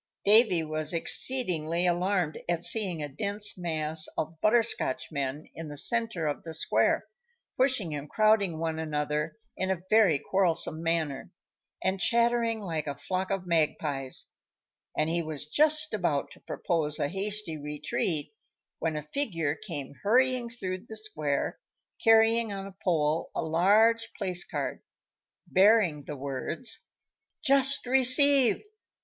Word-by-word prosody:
Davy 205 -5 +5
was 155 +1 -1
exceedingly 175 -5 +2
alarmed 180 -2 0
at 170 -1 0
seeing 185 -9 +2
a - - -3
dense 200 +9 +1
mass 160 -3 0
of 160 +1 -4
Butterscotchmen 155 - 0
in 165 -1 -8
the 145 -1 -8
centre 225 -2 0
of 145 -1 -2
the 160 -1 -6
square, - - +1 0.5
pushing 255 - +1
and 145 0 -6
crowding 215 -6 +2
one 160 0 -3
another 150 +1 -3 0.2
in 190 - -3
a 185 -2 -2
very 210 -9 +5
quarrelsome 165 0 +1
manner, 165 -4 -2 0.5
and 190 +1 0
chattering 235 0 +1
like 160 -6 -4
a 140 - -3
flock 185 +6 -3
of 195 -2 -3
magpies, 150 -5 -1 0.7
and 155 - +1
he 170 +1 0
was 155 -3 -5
just 305 - +2
about 170 -9 -1
to - - -15
propose 155 -4 0
a - - 0
hasty 195 0 -2
retreat, 150 +1 -2 0.5
when 160 -1 -2
a 150 - -4
figure 165 - -2
came 155 -7 -6
hurrying 250 +2 +2
through 185 -6 -5
the 220 - -9
square, 155 -10 -2 0.4
carrying 225 -1 +4
on 195 -1 -5
a 195 -1 -11
pole 160 -3 0
a - - -1
large 210 +8 +3
placard, 185 -4 -1 0.6
bearing 190 -7 +3
the 150 - -6
words: 140 - -2 0.6
"JUST 275 -2 +3
RECEIVED! 260 +1 +4
175 Hz, 130 wpm, -28 LUFS, 155-220 Hz, 0.7 s, Davy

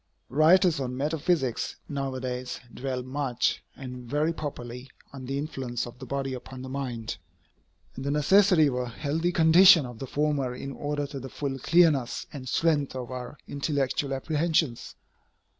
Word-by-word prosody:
Writers 160 +3 +5
on 125 -1 -3
metaphysics 145 -3 0
now 135 -2 -3
a - - -3
days 125 0 -4
dwell 130 -1 -3
much, 130 -1 -1
and 125 -2 -8
very 150 +4 +1
properly, 125 -4 -6 0.2
on 130 -2 -8
the 135 +1 -2
influence 130 -5 -3
of 120 0 -11
the - - -8
body 135 -1 -2
upon 130 +1 -8
the 130 - -7
mind, 125 -7 -4 0.8
and 130 - -6
the 140 - -2
necessity 170 +3 +5
of 140 - +1
a 125 -1 -2
healthy 155 +7 -1
condition 165 -1 +7
of 120 -2 -9
the 135 - -5
former 140 -3 0
in 135 +2 -6
order 145 +1 -2
to 140 -1 -6
the 135 +1 -7
full 135 0 -4
clearness 155 -6 +3
and 130 -3 -6
strength 145 -1 +1
of 125 -1 -5
our 125 +3 -6
intellectual 140 -1 -1
apprehensions. 155 -1 0
135 Hz, 160 wpm, -27 LUFS, 125-150 Hz, 0.8 s, condition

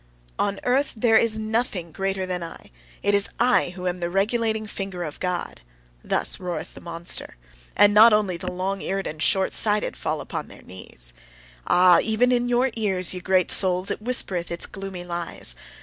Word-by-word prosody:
"On 200 -1 0
earth 265 +3 +1
there 225 0 +5
is 220 -1 +1
nothing 215 -6 -2
greater 195 +2 -2
than 180 -1 -3
I: 165 -1 -9 0.3
it 205 - +2
is 200 0 +3
I 245 -5 +3
who 180 -1 -7
am 180 0 -1
the 170 -1 -2
regulating 220 +3 +1
finger 195 -4 -5
of 150 -3 -7
God" 180 - -3 0.4
thus - - 0
roareth 175 -3 -5
the - - -12
monster. 170 0 -4 0.4
And 205 +1 +6
not 220 +2 +8
only 210 -4 +2
the 180 +1 -5
long 190 +2 -3
eared 195 0 -2
and 155 0 -5
short 190 +2 +2
sighted 210 -1 0
fall - - -2
upon - - -5
their - - -14
knees! 60 -10 -5 0.5
Ah! 180 0 +6
even 225 +3 +2
in 245 0 +1
your 245 +2 +2
ears, 190 -5 +1
ye 180 - -5
great 185 -1 +2
souls, 185 0 0
it - - -4
whispereth 195 -7 0
its 170 - -1
gloomy 195 -3 -7
lies! 170 - -3
195 Hz, 180 wpm, -24 LUFS, 180-215 Hz, 0.5 s, not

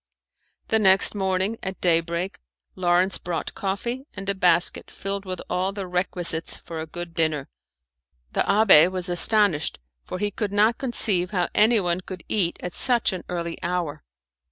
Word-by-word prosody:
The 220 - +2
next 190 -2 +5
morning 190 +2 -1
at 190 0 -6
day 170 -2 +3
break, 170 +3 -5 0.4
Lawrence 180 +1 +1
brought 170 -2 -5
coffee 235 +8 -4
and 195 -1 -7
a - - +2
basket 175 -2 +2
filled 195 0 -5
with 185 -1 -5
all 185 +2 -1
the 200 -1 -5
requisites 180 -2 -1
for 165 -1 -9
a 160 - -7
good 175 +1 -8
dinner. 155 -4 -1 0.8
The - - -1
abbé 195 -5 +5
was 185 -1 -2
astonished, 175 -3 +5 0.3
for 185 - -6
he 205 +1 -2
could 205 0 -4
not 215 +3 +2
conceive 205 -8 +2
how 180 -3 -1
anyone 205 -5 +2
could 185 -2 -9
eat 180 -5 0
at 180 - -5
such 240 -5 +1
an 180 - -6
early 170 -1 -5
hour. 175 - -3
185 Hz, 160 wpm, -23 LUFS, 175-200 Hz, 0.8 s, next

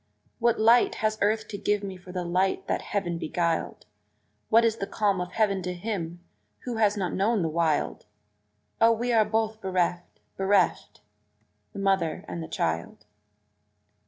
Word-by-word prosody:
What 235 -1 +2
light 230 +2 +5
has 215 0 -1
earth 215 +2 +1
to 200 - -6
give 205 0 0
me 195 -1 -5
for 180 0 -12
the 180 -1 -3
light 185 +2 0
that - - -1
heaven 175 -5 -2
beguiled? 170 0 -2 0.6
What 230 +1 +5
is 225 -1 +1
the 195 - -4
calm 200 -4 0
of 180 - -6
heaven 205 -4 +1
to 180 0 -4
him 175 -3 -4 0.4
who 245 -3 -4
has 210 -1 +2
not 185 -3 -2
known 205 0 +1
the - - +1
wild? 160 -7 0 0.7
O, 230 0 +7
we 240 +2 -1
are 220 -1 +5
both 220 0 -1
bereft, 180 -2 -1 0.2
bereft 195 -1 +1 0.7
the - - -11
mother 195 -5 0
and 170 - -5
the 160 - -6
child! 85 - -3
195 Hz, 160 wpm, -27 LUFS, 175-220 Hz, 0.7 s, O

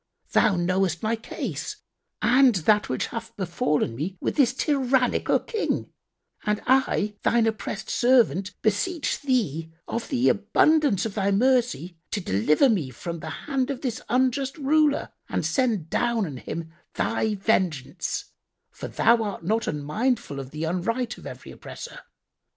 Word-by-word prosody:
Thou 205 - +4
knowest 180 0 0
my 220 +1 +1
case 225 - -5 0.5
and 250 -1 +5
that 210 +4 +2
which 130 - -1
hath 230 0 -6
befallen 150 - 0
me 175 +9 -4
with - - -2
this 270 -5 +4
tyrannical 265 -2 +2
King, 445 -3 -3 0.5
and 210 -1 0
I, 230 -5 +2
Thine 235 -1 +3
oppressed 215 -2 -3
servant, 205 - +2
beseech 290 - 0
Thee, 180 - 0 0.2
of 230 0 -4
the 260 -2 +2
abundance 225 - +3
of 220 - -3
Thy 200 -1 0
mercy, 235 -6 +1
to 210 - -2
deliver 150 - +3
me 185 - +1
from 170 +7 -6
the 160 - -6
hand 270 - -2
of 275 -3 -3
this 245 -5 -3
unjust 260 +3 +1
ruler 300 0 +2 0.2
and - - -1
send 230 - +1
down 235 -3 +1
on 145 -6 -6
him 160 +5 -6 0.2
Thy 220 -1 0
vengeance; 185 - -1 0.4
for - - -7
Thou 235 0 +3
art 205 -5 -4
not 220 +4 0
unmindful 180 - -1
of 135 -1 -7
the 155 +3 -5
unright 230 +9 -1
of - - -9
every - - -9
oppressor. - - -9
220 Hz, 145 wpm, -25 LUFS, 175-255 Hz, 0.5 s, and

